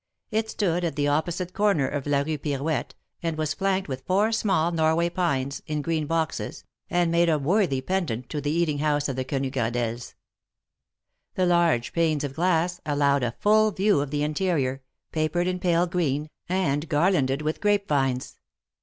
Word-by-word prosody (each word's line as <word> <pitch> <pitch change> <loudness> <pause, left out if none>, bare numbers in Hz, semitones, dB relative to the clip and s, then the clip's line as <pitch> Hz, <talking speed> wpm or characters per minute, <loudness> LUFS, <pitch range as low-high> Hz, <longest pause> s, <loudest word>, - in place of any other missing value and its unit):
It 220 0 0
stood 180 -4 0
at 170 - -1
the 145 -1 +1
opposite 170 +4 -1
corner 200 -10 +2
of 145 0 -4
la 140 -1 +2
Rue 155 +1 -2
Pirouette, 145 -1 -2 0.3
and 165 -2 -2
was 155 -1 -1
flanked 195 +2 0
with 130 -2 -5
four 205 +4 +2
small 190 -7 +1
Norway 165 +1 +2
pines, 140 -7 -1
in 150 -1 -2
green 160 -2 -1
boxes, 160 0 -2 0.3
and 175 -1 +2
made 170 0 +3
a 155 - +3
worthy 150 -2 +1
pendant 130 -8 -2
to 150 - -3
the 145 - -2
eating 155 -2 +1
house 145 -1 +1
of 135 - -3
the 130 - -1
Quenu 135 0 -2
Gradelles. 120 -2 -2 1.2
The 185 - +2
large 170 -9 +2
panes 160 -3 +1
of 140 -2 -3
glass 175 +2 +1
allowed 145 -2 +2
a 120 -2 -2
full 215 +1 +4
view 200 -6 +2
of 145 - -3
the 145 +1 -1
interior, 150 -4 0 0.3
papered 160 +3 0
in 180 0 -1
pale 175 -1 +2
green, 155 -4 -1 0.2
and 165 -5 0
garlanded 145 -4 +2
with 155 +1 -2
grape 205 -1 +2
vines. 135 -3 -1
155 Hz, 175 wpm, -25 LUFS, 140-180 Hz, 1.2 s, full